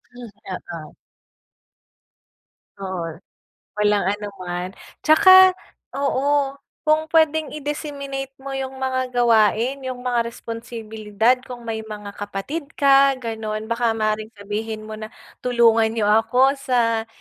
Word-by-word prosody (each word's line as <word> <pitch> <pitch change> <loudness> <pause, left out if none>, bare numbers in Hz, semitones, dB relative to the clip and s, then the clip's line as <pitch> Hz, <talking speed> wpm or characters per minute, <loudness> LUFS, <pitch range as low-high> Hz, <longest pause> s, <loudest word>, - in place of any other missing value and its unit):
Hmm, 245 -1 -9 0.5
oo. - - -9 1.8
Oo. 180 -4 -4 0.6
walang 210 -2 +2
ano 205 +2 -1
man. 180 0 -4 0.3
Tsaka, 375 +4 +8 0.5
oo, 280 0 +1 0.3
kung 310 +1 +2
pwedeng 315 -2 +3
i-disseminate 280 -2 -5
mo 270 0 -7
yung 265 0 -4
mga 260 -1 -1
gawain, 240 +2 +2
yung 255 -1 -5
mga 245 -1 +1
responsibilidad, 225 -1 -2
kung 245 -2 -10
may 220 -1 -3
mga 210 -2 -8
kapatid 205 +11 -5
ka, 275 -1 +5
gano'n. 220 -3 -4
Baka 230 0 0
maaaring 215 0 -1
sabihin 215 +2 -5
mo 215 - -7
na, 215 0 -7 0.3
tulungan 230 -2 +4
niyo 220 -1 -1
ako 245 +6 +4
sa 230 -4 +1
235 Hz, 115 wpm, -22 LUFS, 215-270 Hz, 1.8 s, Tsaka